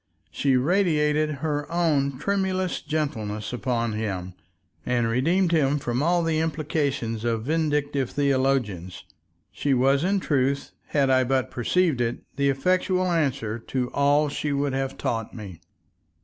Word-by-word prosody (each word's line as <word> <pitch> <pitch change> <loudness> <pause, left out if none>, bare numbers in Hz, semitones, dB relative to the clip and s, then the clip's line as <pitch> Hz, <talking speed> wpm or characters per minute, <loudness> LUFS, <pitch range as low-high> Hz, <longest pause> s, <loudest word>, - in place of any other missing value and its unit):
She 135 -2 +2
radiated 155 -1 +2 0.2
her 145 -1 -2
own 145 -6 +1
tremulous 185 +2 -1
gentleness 110 -9 -3
upon 120 -2 -1
Him, 95 -4 -3 0.5
and 120 -2 +1
redeemed 165 +10 +2
Him 145 -3 +2
from 125 -2 -2
all 170 +2 +2
the 160 -1 +1
implications 145 -8 -1
of 115 -2 -1
vindictive 145 -3 0
theologians; 130 -10 0 0.5
she 140 -2 0
was 135 +3 +3
in 195 +2 +2
truth, 140 -4 0 0.2
had 140 -3 +2
I 130 0 +4
but 130 0 0
perceived 150 +2 +1
it, 120 0 -2
the 140 0 +2
effectual 185 +5 +1
answer 135 -9 0
to 125 +2 -3
all 145 +1 +3
she 145 +1 -3
would 140 -1 0
have 135 0 -2
taught 115 -2 -3
me. 95 -7 -9
140 Hz, 135 wpm, -25 LUFS, 125-155 Hz, 0.5 s, I